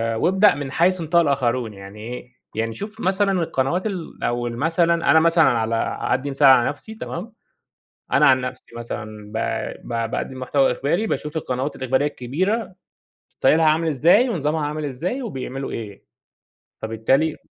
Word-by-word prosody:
وابدأ 190 - +4
من 140 -2 -5
حيث 180 +3 +2
انتهى 170 +2 +3
الآخرون، 125 -6 0
يعني 100 +2 -11
إيه، 125 +2 -8 0.2
يعني 115 0 -2
شوف 215 +2 -8
مثلًا 195 +2 +1
القنوات 165 +6 -1
ال 185 -5 -6
أو 120 0 -1
ال 115 - -5
مثلًا 165 +4 +2 0.2
أنا 160 - +7
مثلًا 165 +1 +4
على 115 -1 0 0.3
هادّي 135 +2 0
مثال 140 0 +4
على 130 -3 +6
نفسي، 220 +9 -8
تمام؟ 215 +1 -6 0.8
أنا - - +5
عن 130 -1 +5
نفسي 125 0 -6
مثلًا 110 -3 -7
ب 110 - -4 0.5
ب 115 -1 -2
باقدم 130 - -4
محتوى 135 +1 +2
إخباري 155 - 0
باشوف 150 -5 -3
القنوات 130 0 -3
الإخبارية 130 +2 0
الكبيرة 185 - -2 0.5
ستايلها 160 +1 +2
عامل 160 +1 +3
إزاي 170 - +4
ونظامها 155 -5 -1
عامل 150 +1 -3
إزاي 170 - -3
وبيعملوا 135 - -5
إيه، 105 -4 -7 0.8
فبالتالي 135 +8 +1
140 Hz, 155 wpm, -22 LUFS, 125-170 Hz, 0.8 s, أنا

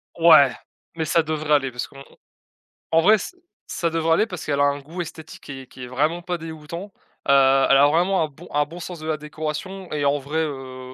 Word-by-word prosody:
Ouais. 155 -5 +7 0.4
Mais 160 -1 -2
ça 165 +2 +3
devrait 155 -1 -1
aller 135 -3 +2
parce 125 0 -4
qu'on 135 0 -13 0.9
en 165 - +5
vrai 210 +6 +6
ç 210 - -7 0.3
ça 170 - -1
devrait 165 0 0
aller 215 +7 +2
parce 180 -6 -7
qu'elle 140 -2 -1
a - - +4
un 145 0 +1
goût 165 +6 -6
esthétique 160 -1 -9
qui 135 -2 -8
est 130 - -14
qui 130 - -11
est 125 - -6
vraiment 150 +7 0
pas 175 0 -3
dégoûtant. 165 +4 -8 0.4
Heu, - - +4
elle 135 0 +5
a 140 +1 +6
vraiment 175 +5 +2
un - - -1
bon 155 +4 -15
un 145 0 +2
bon 165 +4 -10
sens 175 -1 -7
de 155 - -7
la 155 -1 0
décoration 155 +5 -6
et 145 -1 -1
en 140 +1 +2
vrai, 145 +4 -3
heu, 130 -4 -5
155 Hz, 230 wpm, -23 LUFS, 140-165 Hz, 0.9 s, Ouais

